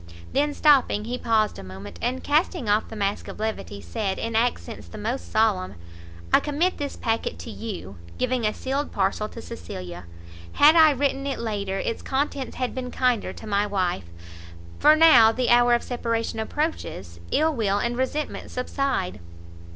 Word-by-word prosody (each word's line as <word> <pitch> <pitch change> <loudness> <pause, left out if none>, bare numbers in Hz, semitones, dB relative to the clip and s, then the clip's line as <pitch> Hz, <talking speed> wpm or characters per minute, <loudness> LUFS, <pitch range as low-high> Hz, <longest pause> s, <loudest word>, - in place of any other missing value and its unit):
Then, 290 +1 +1
stopping, 270 -8 +4
he 245 +2 -3
paused 220 -2 +1
a - - -8
moment, 95 +2 -10
and 255 +2 -2
casting 305 - +1
off 210 +1 +2
the 225 - -9
mask 200 -1 -2
of - - -8
levity, 215 - -4
said 190 - -3
in 230 0 -3
accents 235 0 -1
the 215 - -10
most 230 +5 -4
solemn 210 - +1 0.6
"I - - +8
commit 315 +5 0
this 285 -1 -3
packet 225 0 -2
to 230 - -8
you," 185 - -7 0.2
giving 255 -1 0
a 215 - +2
sealed 275 +5 -3
parcel 200 +2 0
to 230 - -9
Cecilia; 90 - -8 0.5
"had 300 +3 +7
I 320 -2 +8
written 275 0 0
it 275 - -2
later, 200 -4 -3
its 230 - -3
contents 270 -1 -2
had 255 -1 -2
been 255 -1 -4
kinder 250 -4 0
to - - -11
my 205 -1 +1
wife, 185 - -1 0.7
for 305 +1 +7
now 310 -9 +7
the 250 +2 -1
hour 240 0 +6
of 235 - -2
separation 230 -2 -2
approaches, 220 - -3
ill 315 +1 +2
will 205 -6 +1
and 235 +3 -1
resentment 260 +4 -3
subside. 250 -6 -2
230 Hz, 170 wpm, -25 LUFS, 205-270 Hz, 0.7 s, I